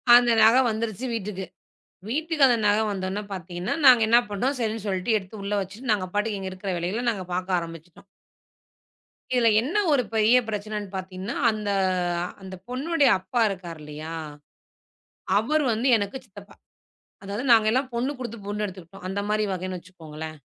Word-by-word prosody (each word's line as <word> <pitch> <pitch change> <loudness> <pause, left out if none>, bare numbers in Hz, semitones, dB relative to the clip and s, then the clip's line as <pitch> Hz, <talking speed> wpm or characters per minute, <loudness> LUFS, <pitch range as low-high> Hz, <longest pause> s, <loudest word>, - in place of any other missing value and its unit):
அந்த 240 0 +6
நக 225 +2 +7
வந்துருச்சு 220 +1 -3
வீட்டுக்கு. 200 -3 -4 0.6
வீட்டுக்கு 310 +2 +2
அந்த 240 -2 +3
நக 205 +1 +4
வந்துடனே 190 +1 -3
பாத்தீங்கன்னா 175 0 -4
நாங்க 250 -3 +8
என்ன 230 +2 +6
பண்டோம். 250 +7 -1
சரின்னு 220 -2 -2
சொல்லிட்டு 190 +3 0
எடுத்து 190 +2 -12
உள்ள 200 +1 -2
வச்சுட்டு 210 +6 -4
நாங்க 190 -3 -2
பாட்டுக்கு 210 -1 0
எங்க 190 -1 -5
இருக்கிற 190 +1 -5
வேலைகல 205 +8 -2
நாங்க 195 -4 -5
பாக்க 185 0 0
ஆரம்பிச்சிட்டோம். 165 +1 -10 1.3
இதுல 245 -2 +4
என்ன 280 - -4 0.2
ஒரு 275 -4 +3
பெரிய 220 +3 +5
பிரச்சனன்னு 210 -1 -4
பாத்தீங்கன்னா, 190 +5 -5 0.2
அந்த 210 -1 -4 0.7
அந்தப் 190 -1 -10
பொண்ணோடய 280 +2 +2
அப்பா 190 +6 -1
இருக்காரு 175 -4 -7
இல்லையா? 150 +2 -7 1.2
அவரு 295 +9 +1
வந்து 230 +4 0
எனக்கு 205 +4 -3
சித்தப்பா. 205 -1 -14 0.7
அதாவது 200 +4 -4
நாங்க 220 -2 +6
எல்லாம் 260 +2 0
பொண்ணு 255 +4 0
கொடுத்து 235 -2 -5
பொண்ணு 210 +1 -2
எடுத்துக்கிட்டோம். 185 -1 -10
அந்த 190 +2 -2
மாரி 215 0 +1
வகனு 185 0 -4
வச்சுக்கோங்களேன். 160 -3 -9
205 Hz, 150 wpm, -25 LUFS, 185-235 Hz, 1.3 s, நாங்க